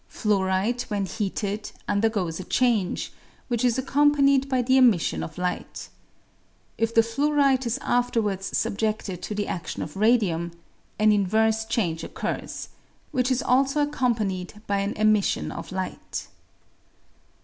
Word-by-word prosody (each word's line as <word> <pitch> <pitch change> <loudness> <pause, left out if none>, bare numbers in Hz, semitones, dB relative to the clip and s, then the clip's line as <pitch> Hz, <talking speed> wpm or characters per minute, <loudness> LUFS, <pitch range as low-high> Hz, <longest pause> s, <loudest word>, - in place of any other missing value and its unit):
Fluorite 200 +3 0
when 205 -2 -1
heated 205 +1 -3 0.2
undergoes 200 -5 0
a - - -4
change, 225 -4 0 0.4
which 240 -1 0
is 245 -1 +2
accompanied 275 0 +3
by 255 -2 +1
the 260 +2 +3
emission 210 - +4
of 80 - -7
light. 180 0 -4 0.9
If 225 0 0
the 225 - +6
fluorite 275 +1 +2
is 235 +3 0
afterwards 220 -6 0
subjeded 210 -3 -2
to 210 - -4
the 205 0 -1
adion 175 - -4
ot 150 - -8
radium, 195 -6 +2 0.4
an 215 0 +4
inverse 220 +2 +2
change 180 -8 -1
occurs, - - -5 0.4
which 255 -3 +1
is 255 -1 +1
also 270 +3 +2
accompanied 215 -10 -1
by 200 0 0
an 200 +1 -1
emission 215 -1 +2
of - - -7
light. 185 0 -5
220 Hz, 130 wpm, -25 LUFS, 195-250 Hz, 0.9 s, the